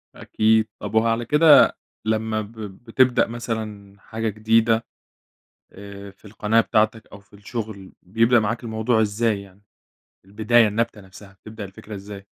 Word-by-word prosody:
أكيد، 110 0 +1
طب 110 - -6
هو 110 +1 +3
على 115 +1 0
كده 150 +2 +5 0.3
لما 110 0 -1
ب 105 +1 -10 0.3
بتبدأ 125 +1 +2
مثلًا 110 -4 -6
حاجة 110 +2 -4
جديدة، 110 +2 +1 0.9
آآ، 100 0 -11
في 95 - -27
القناة 110 +2 +1
بتاعتك 110 0 0
أو 100 - -11
في 100 - -31
الشغل 105 -2 -7
بيبدأ 115 +5 +2
معاك 115 +3 -3
الموضوع 110 0 0
إزاي 105 -1 0
يعني، 100 +1 -18 0.6
البداية، 110 +3 +3
النبتة 115 0 -2
نفسها، 95 +1 -15
بتبدأ 110 -1 -9
الفكرة 100 +2 -11
إزاي؟ 100 0 -10
110 Hz, 140 wpm, -22 LUFS, 100-115 Hz, 0.9 s, كده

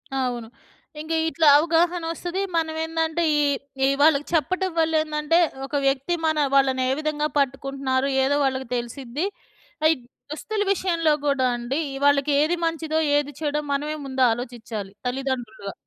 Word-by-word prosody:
అవును. 245 -3 -2 0.5
ఇంకా 320 +1 -2
ఇట్లా 320 -1 +2
అవగాహనొస్తది. 340 +2 0 0.2
మనం 320 -1 -1
ఏందంటే 325 +1 -1
ఈ - - +3 0.4
ఈ - - +4
వాళ్ళకి 295 -1 +4
చెప్పటం 370 +4 +1
వల్ల 320 0 +2
ఏందంటే 305 +2 +1 0.3
ఒక 275 - -14
వ్యక్తి 275 +5 0
మన 315 -1 +1 0.2
వాళ్ళనే 260 -1 +3
విధంగా 305 -1 -1
పట్టుకుంటున్నారో 275 0 -1 0.2
ఏదో 280 +2 +2
వాళ్ళకి 265 -1 -1
తెలిసిద్ది. 245 +5 -4 0.6
ఆ - - +3
ఈ - - -5 0.4
దుస్తుల 415 +7 -3
విషయంలో 335 -5 +1 0.2
కూడా 275 -2 +2
అండి 240 +4 -3 0.3
వాళ్ళకేది 285 +3 +3
మంచిదో, 320 -1 -1 0.2
ఏది 290 0 -1
చెడో 300 -1 0
మనమే 295 +2 -1
ముందు 265 -1 -3
ఆలోచిచాలి 225 -4 -5 0.2
తల్లిదండ్రులుగా. 245 -6 -4
290 Hz, 130 wpm, -24 LUFS, 265-320 Hz, 0.6 s, ఈ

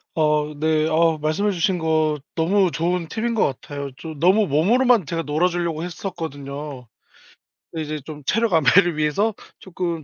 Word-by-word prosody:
어 150 -1 +1
네. 155 0 +2
어 160 0 +2
말씀해 155 +7 0
주신 180 0 0
거 155 -2 +1 0.2
너무 180 +2 +2
좋은 170 0 -1
팁인 230 +5 -2
것 - - +3
같아요. 140 +1 -5
좀 155 -1 -8
너무 190 +4 +4
몸으로만 220 - +3
제가 165 +2 -3
놀아 155 +5 +1
주려고 170 -2 -2
했었거든요. 145 - -6 0.8
근데 160 -1 -4
이제 155 0 -4
좀 150 -2 -9
체력 225 +4 +1
안배를 165 +2 +4
위해서 195 +9 +1 0.3
쪼끔 170 -3 -4
160 Hz, 315 characters per minute, -22 LUFS, 150-180 Hz, 0.8 s, 너무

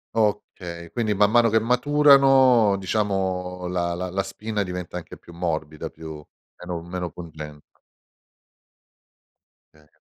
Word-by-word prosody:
Okay, 95 -5 -2
quindi 115 -3 0
man 105 0 +3
mano 115 +1 +4
che 110 +1 +3
maturano 130 -3 +5
diciamo, 95 -2 -2
la 85 -1 -1
la 90 +1 -4
la 100 +2 -1
spina 105 +2 -3
diventa 90 -1 -6
anche 90 - -9
più 85 - -15
morbida, 80 -3 -3
più 80 -2 -10 0.3
meno 90 -1 -5
meno 90 0 -5
pungente. 75 -3 -10 2.1
Okay. 75 -1 -23
90 Hz, 120 wpm, -24 LUFS, 85-110 Hz, 2.1 s, maturano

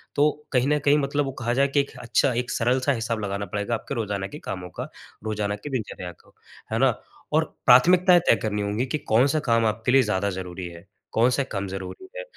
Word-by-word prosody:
तो 145 +1 +4 0.2
कहीं 125 0 +3
न 150 0 +2
कहीं 145 +1 +5
मतलब 145 +1 0
वो 135 - -3
कहा 120 +1 +1
जाए 135 +2 +3
कि 140 +1 +1
एक 140 - -1
अच्छा 125 +2 +1
एक 120 +1 -2
सरल-सा 130 +3 +1
हिसाब 115 -2 -2
लगाना 100 0 -3
पड़ेगा 105 +3 -1
आपके 140 - -5
रोज़ाना 100 -4 -2
के 150 - -9
कामों 90 -1 -5
का, - - -7 0.4
रोज़ाना 105 -1 -1
की 105 +8 -8
दिनचर्या 105 -7 -4
को, - - -25 0.4
है - - +1
ना? - - +3 0.3
और - - +4 0.2
प्राथमिकताएँ 180 +7 +6
तय - - +7
करनी 105 -1 -1
होंगी 105 +5 -1
कि 155 - -1
कौन-सा 135 +5 +2
काम 115 0 +4
आपके 110 +3 -1
लिए 135 +1 +6
ज़्यादा 100 -2 0
ज़रूरी 90 -1 -6
है, 85 +2 -13 0.2
कौन-से 125 +4 +2
काम 100 -6 -4
ज़रूरी 95 - -7
है, - - -4
115 Hz, 215 wpm, -24 LUFS, 100-135 Hz, 0.4 s, तय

